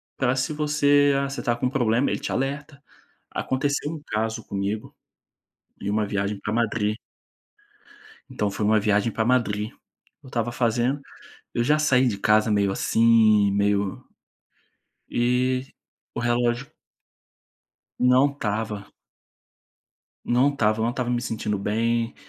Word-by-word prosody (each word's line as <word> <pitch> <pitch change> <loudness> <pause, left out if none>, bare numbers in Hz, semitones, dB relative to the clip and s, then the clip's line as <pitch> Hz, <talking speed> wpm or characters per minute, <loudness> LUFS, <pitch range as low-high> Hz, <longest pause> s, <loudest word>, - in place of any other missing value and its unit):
Para 130 -1 +1
se 130 +4 -1
você 145 -1 +3
"Ah, 140 0 -1
você 135 - -5
está 120 - +1
com 120 - -3
um - - +2
problema?" 120 -1 +1
Ele - - -2
te - - -4
alerta. 140 +2 -3 0.5
Aconteceu 145 +3 -1
um 155 -3 -7
caso 110 0 -2
comigo, 100 +2 -4 0.9
em 100 - -4
uma 105 0 0
viagem 100 0 -2
para 105 - -4
Madrid 110 -2 0 1.3
Então, 105 -1 -1
foi 105 +2 -3
uma 110 +1 +4
viagem 105 +1 +1
para 110 0 -1
Madrid. 110 -3 +1 0.5
Eu - - -16
estava 120 -1 -2
fazendo 120 +3 0 0.5
eu 120 - +1
já 150 +5 +3
saí 130 -4 +3
de 100 -4 -2
casa 110 +1 +3
meio 100 -1 +2
assim, 110 -1 +4
meio 100 -1 0 1.1
e 125 +2 +1 0.5
o - - -3
relógio 120 +1 0 1.3
Não 125 +2 +5
estava. 105 -5 -3 1.4
Não 125 +3 +3
estava, 110 -5 +1
eu - - +1
não 115 - +1
estava 125 0 -3
me 120 0 0
sentindo 110 -3 -2
bem, 115 +3 0
115 Hz, 135 wpm, -24 LUFS, 105-130 Hz, 1.4 s, Não